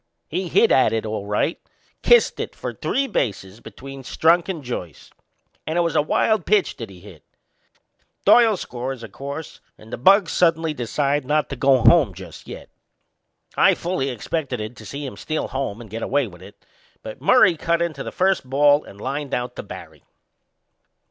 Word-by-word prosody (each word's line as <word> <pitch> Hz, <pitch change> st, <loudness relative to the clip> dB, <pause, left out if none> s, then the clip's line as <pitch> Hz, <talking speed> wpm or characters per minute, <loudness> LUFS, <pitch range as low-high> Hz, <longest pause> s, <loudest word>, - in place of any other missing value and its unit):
He 180 Hz, +3 st, -2 dB
hit -, -, +3 dB
at 130 Hz, -4 st, +4 dB
it 110 Hz, 0 st, -1 dB
all 105 Hz, -2 st, -4 dB
right 105 Hz, +10 st, -1 dB, 0.4 s
kissed 480 Hz, 0 st, +4 dB
it -, -, -5 dB
for -, -, -5 dB
three 275 Hz, -, -1 dB
bases 100 Hz, -, -3 dB
between 135 Hz, +2 st, -10 dB
Strunk 165 Hz, +7 st, +2 dB
and 165 Hz, -6 st, -4 dB
Joyce! 90 Hz, -, -7 dB, 0.6 s
And 160 Hz, +2 st, -1 dB
it -, -, +4 dB
was 170 Hz, -2 st, -1 dB
a -, -, +4 dB
wild 205 Hz, +6 st, +1 dB
pitch 210 Hz, -2 st, +2 dB
that 115 Hz, -4 st, -7 dB
he 90 Hz, -2 st, -14 dB
hit. 90 Hz, -6 st, -14 dB, 1.0 s
Doyle 225 Hz, -4 st, +6 dB
scores, 125 Hz, -4 st, -6 dB
o' -, -, -6 dB
course, 140 Hz, +8 st, -8 dB, 0.2 s
and 110 Hz, +1 st, -14 dB
the -, -, -5 dB
bugs 195 Hz, -, +5 dB
suddenly 165 Hz, -2 st, +2 dB
decide 140 Hz, +3 st, -1 dB
not 150 Hz, +3 st, 0 dB
to 135 Hz, -, -4 dB
go 135 Hz, -1 st, +3 dB
home 135 Hz, -, +5 dB
just 95 Hz, +1 st, -11 dB
yet. -, -, -9 dB, 0.9 s
I -, -, +5 dB
fully 170 Hz, -6 st, -2 dB
expected 125 Hz, -3 st, -4 dB
to -, -, -13 dB
see 140 Hz, +1 st, -6 dB
him 130 Hz, -, -7 dB
steal 155 Hz, 0 st, -3 dB
home 130 Hz, -6 st, -3 dB
and 120 Hz, -, -10 dB
get 110 Hz, +3 st, -7 dB
away 140 Hz, +3 st, +1 dB
with 90 Hz, -5 st, -12 dB
it, -, -, -15 dB, 0.4 s
but 110 Hz, -, -9 dB
Murray 190 Hz, -9 st, +5 dB
cut 170 Hz, +1 st, 0 dB
into 165 Hz, -5 st, -2 dB
the -, -, -5 dB
first 185 Hz, -8 st, 0 dB
ball 145 Hz, +2 st, +4 dB
and 100 Hz, -, -14 dB
lined 140 Hz, +4 st, -3 dB
out 125 Hz, 0 st, -4 dB
to -, -, -3 dB
Barry. -, -, -11 dB
140 Hz, 180 wpm, -22 LUFS, 115-165 Hz, 1.0 s, Doyle